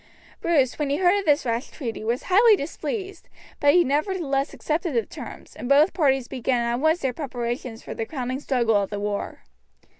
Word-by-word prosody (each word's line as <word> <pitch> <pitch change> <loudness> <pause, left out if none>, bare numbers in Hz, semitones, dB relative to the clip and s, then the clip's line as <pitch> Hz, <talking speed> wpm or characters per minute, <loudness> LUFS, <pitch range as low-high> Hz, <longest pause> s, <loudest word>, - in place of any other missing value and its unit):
Bruce, 285 -7 +2
when 295 -2 0
he 285 - +1
heard 375 +2 +3
of 395 - -5
this 295 -1 +3
rash 235 +3 -2
treaty, 235 -7 -6
was 235 +3 -1
highly 425 +4 +6
displeased, 390 - -5 0.3
but 290 +2 +4
he 355 - +6
nevertheless 290 -1 0
accepted 320 -1 -2
the 230 -3 +1
terms, 260 -8 -10
and 245 - -6
both 290 +6 +5
parties 270 -6 +2
began 250 -1 -1
at 235 +1 -1
once 315 +4 +2
their 265 -2 -1
preparations 240 -3 -4
for - - -6
the - - -3
crowning 260 -3 -3
struggle 240 -6 +1
of 200 -1 -1
the 205 - -4
war. 205 0 -4
275 Hz, 190 wpm, -24 LUFS, 240-320 Hz, 0.3 s, highly